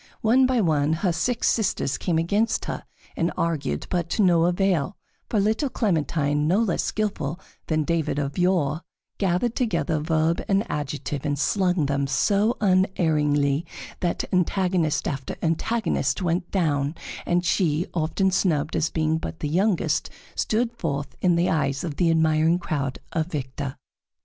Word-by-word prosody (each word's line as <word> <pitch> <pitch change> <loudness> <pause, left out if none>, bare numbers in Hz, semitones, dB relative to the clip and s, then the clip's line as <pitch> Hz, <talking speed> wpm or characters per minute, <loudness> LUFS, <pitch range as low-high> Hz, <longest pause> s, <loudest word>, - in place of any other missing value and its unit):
One 255 +4 +4
by 255 -3 +2
one 155 -4 +2
her 180 - +3
six 235 +8 0
sisters 195 - 0
came 170 -3 0
against 200 +8 +1
her - - -5 0.3
and 170 - 0
argued, 150 - -1
but 170 -2 -1
to 210 - +1
no 170 -3 +4
avail, 180 -1 +1 0.3
for 215 - +1
little 220 +8 +1
Clementine, 150 - 0
no 180 +5 +3
less 220 -6 +1
skillful 175 -7 -2 0.3
than 155 -1 +1
David 160 -2 -1
of 140 -1 -2
yore, 175 -4 +1 0.4
gathered 195 +5 +1
together 200 -9 0
verb 160 +1 +1
and 195 +1 +2
adjective 145 -1 -3
and 145 -2 -1
slung 180 +1 +1
them 140 0 0
so 200 - +2
unerringly 160 -7 +2 0.4
that 175 -1 -1
antagonist 180 -3 +1
after 135 -2 -4
antagonist 215 +10 0
went 175 -1 -1
down, 150 -5 0 0.3
and 175 0 +1
she, 165 -2 +1
often 180 +4 +1
snubbed 160 -5 +1
as 160 0 +1
being 160 0 0
but 160 - -6
the 150 - -2
youngest, 185 +3 +1 0.2
stood 235 +2 0
forth 140 -4 -3
in 180 -2 +3
the 170 +1 +2
eyes 140 -3 0
of 160 -5 -4
the 175 -2 +3
admiring 160 +1 +3
crowd 145 -6 -3 0.2
a 160 - +1
victor. 140 -4 -5
165 Hz, 150 wpm, -24 LUFS, 150-190 Hz, 0.4 s, One